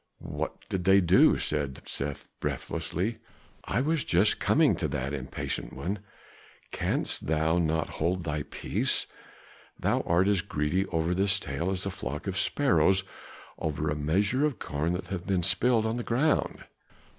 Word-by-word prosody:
"What - - -4
did 90 -2 -3
they 95 +1 +6
do?" 90 0 +5
said 70 -3 -2
Seth 70 0 -4
breathlessly. 105 +7 -2 0.5
"I 115 - 0
was 155 +1 +1
just 95 +5 +3
coming - - +4
to - - -1
that, 70 +3 -3
impatient 65 -3 -4
one. 100 +4 -3 0.7
Canst - - -1
thou 80 +2 +2
not 80 -1 0
hold 90 +2 +1
thy 75 -1 -2
peace? - - 0 0.7
Thou - - +1
art 85 +3 +3
as 100 -3 +3
greedy 80 +6 -1
over 80 0 0
this 100 +2 +2
tale 85 +2 -3
as 95 -1 -1
a 100 - -2
flock 75 -1 -5
of 95 -1 -2
sparrows 95 - +3 0.6
over 75 -1 -1
a - - -1
measure 100 - +1
of 150 -6 +1
corn 75 0 -2
that 90 - -4
hath 90 -2 -4
been 95 -3 +1
spilled 110 +5 +3
on 110 +2 -1
the 120 - -3
ground." 135 +8 +1
90 Hz, 155 wpm, -28 LUFS, 80-100 Hz, 0.7 s, they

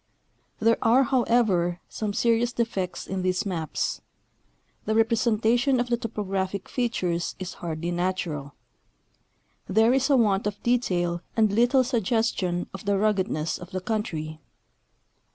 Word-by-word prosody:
There 225 +1 +3
are, 245 +4 +5
however, 230 -9 +2
some 215 -2 -3
serious 235 +2 +2
defects 210 -7 -2
in 190 -1 -3
these 185 +3 0
maps. 165 -6 -2 0.8
The 220 - 0
representation 230 +3 +2
of 245 0 -1
the 240 - +3
tojjographic 195 -4 -3
features 185 -9 -1
is 185 -1 -6
hardly 170 0 -3
natural. 175 -5 -2 1.1
There 220 +5 +4
is 270 +1 +2
a 275 - +5
want 205 -3 +2
of 205 0 -5
detail 175 -8 +1 0.2
and 215 -2 +4
little 245 +4 +4
suggestion 225 -7 0
of 195 - -8
the 200 0 +2
ruggedness 190 -7 0
of 175 - -10
the 185 - -3
country. 170 -7 -3
205 Hz, 130 wpm, -26 LUFS, 180-235 Hz, 1.1 s, are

